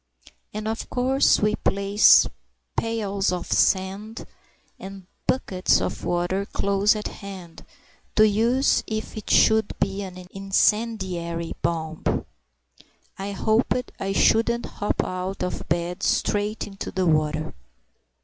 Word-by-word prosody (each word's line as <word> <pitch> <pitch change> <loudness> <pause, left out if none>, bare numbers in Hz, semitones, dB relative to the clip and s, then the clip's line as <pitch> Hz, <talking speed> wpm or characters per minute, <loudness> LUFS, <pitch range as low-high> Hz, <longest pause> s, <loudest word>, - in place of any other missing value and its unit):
And 215 +1 -5
of 220 +1 -4
course 260 +2 +3
we 210 0 +2
placed 200 +1 +5 0.5
pails 205 -4 -1
of 180 -1 -3
sand 195 +4 0 0.5
and 195 -1 -9 0.2
buckets 190 -8 +2
of - - -4
water 175 +3 0
close 200 +2 +2
at 210 - -4
hand, 190 -5 -10 0.5
to 215 0 +6
use 230 +6 +2
if 220 0 -4
it 215 - -7
should 220 -1 +3
be 195 0 -1
an 185 -2 -8
incendiary 190 -4 0
bomb. 160 -2 -2 0.9
(I 200 +1 -4
hoped 225 +5 0
I 195 - -2
shouldn't 230 +4 +2
hop 205 - -2
out 185 +1 -4
of 180 - -4
bed 175 +3 -1
straight 210 +1 0
into 195 -1 -7
the 185 -1 -1
water!) 155 - +1
195 Hz, 120 wpm, -24 LUFS, 185-215 Hz, 0.9 s, to